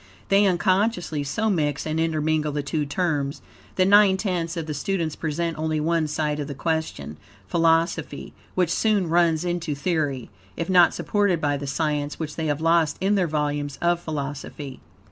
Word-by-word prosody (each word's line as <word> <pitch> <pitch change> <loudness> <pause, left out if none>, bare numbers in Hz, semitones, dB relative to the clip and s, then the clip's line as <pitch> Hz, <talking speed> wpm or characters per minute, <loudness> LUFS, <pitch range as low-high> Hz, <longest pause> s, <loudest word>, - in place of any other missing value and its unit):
They, 200 +1 +5
unconsciously, 180 -3 +1
so 220 +10 0
mix 150 -6 -1
and 155 0 -1
intermingle 155 -1 0
the 145 0 -2
two 145 +1 -2
terms, 145 -4 -1 0.3
that 185 - +3
nine 200 -1 +6
tenths 175 -4 -2
of 165 - -3
the 155 - -4
students 160 +1 -2
present 165 0 -2
only 155 0 0
one 165 0 +1
side 150 0 -1
of 145 - -3
the 140 - -6
question 160 - -3 0.3
philosophy, 165 - +1 0.2
which 180 -3 +1
soon 205 -5 +1
runs 170 -1 +2
into 175 -3 -2
theory, 145 -6 -2 0.3
if 170 +2 -2
not 175 -2 +6
supported 205 -5 +1
by 145 -2 0
the 140 0 -5
science, 150 0 -1
which 150 -2 -4
they 160 -1 -2
have 145 0 -1
lost 165 -2 +2
in 195 +2 +1
their 190 -4 +2
volumes 145 -2 -2
of 175 0 +2
philosophy. 145 -3 -6
160 Hz, 170 wpm, -24 LUFS, 150-175 Hz, 0.3 s, nine